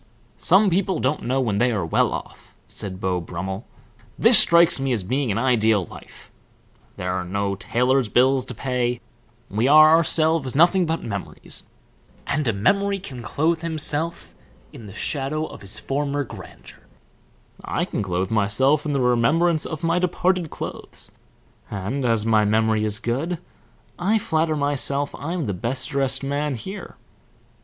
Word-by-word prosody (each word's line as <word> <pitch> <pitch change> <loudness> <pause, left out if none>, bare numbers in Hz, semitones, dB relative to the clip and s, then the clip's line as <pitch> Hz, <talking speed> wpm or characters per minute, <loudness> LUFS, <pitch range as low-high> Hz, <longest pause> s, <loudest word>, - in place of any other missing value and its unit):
"Some 195 +2 +4
people 190 +2 0
don't 135 +4 -1
know 130 +2 +1
when 110 -6 0
they 125 +1 +3
are 100 -7 -1
well 80 - +1
off," - - -8
said 95 -2 -5
Beau 90 -2 -1
Brummel. 95 +5 -6 0.5
"This - - +8
strikes 170 -3 +5
me 135 0 -1
as 110 -5 -2
being 130 +4 -1
an 100 - -1
ideal 110 -6 +2
life. - - -14 0.7
There 90 0 -2
are 95 -1 -2
no 100 +2 -2
tailors 125 +4 0
bills 130 +2 +3
to 125 - -7
pay 125 0 -1 0.5
we 110 +5 0
are 155 +2 +8
ourselves 160 -4 +1
nothing 175 +3 +4
but 165 +1 -2
memories, 100 -3 -5 0.6
and 145 -1 -1
a - - +3
memory 200 - +1
can 140 -10 -9
clothe 160 +9 0
himself 160 0 -2 0.4
in 110 - -11
the 100 - -11
shadow 150 +4 -2
of - - -11
his 100 +2 -4
former 145 +2 -2
grandeur 115 - -12 0.8
I - - -1
clothe 95 0 -2
myself 130 +8 +2
in 145 - -1
the 135 - +1
remembrance 150 +7 +2
of 160 0 -6
my 165 +2 +2
departed 180 -1 0
clothes, - - -8 0.6
and 105 +8 -3
as 115 -3 +2
my 110 -1 +3
memory 110 +1 +2
is 105 0 -1
good 140 +11 -2 0.6
I 200 +5 +2
flatter 160 -5 0
myself 145 0 -1
I'm 165 +1 -4
the 100 - -2
best 120 - -3
dressed 135 -2 0
man 140 0 -1
here. 190 - -8
135 Hz, 155 wpm, -23 LUFS, 110-160 Hz, 0.8 s, This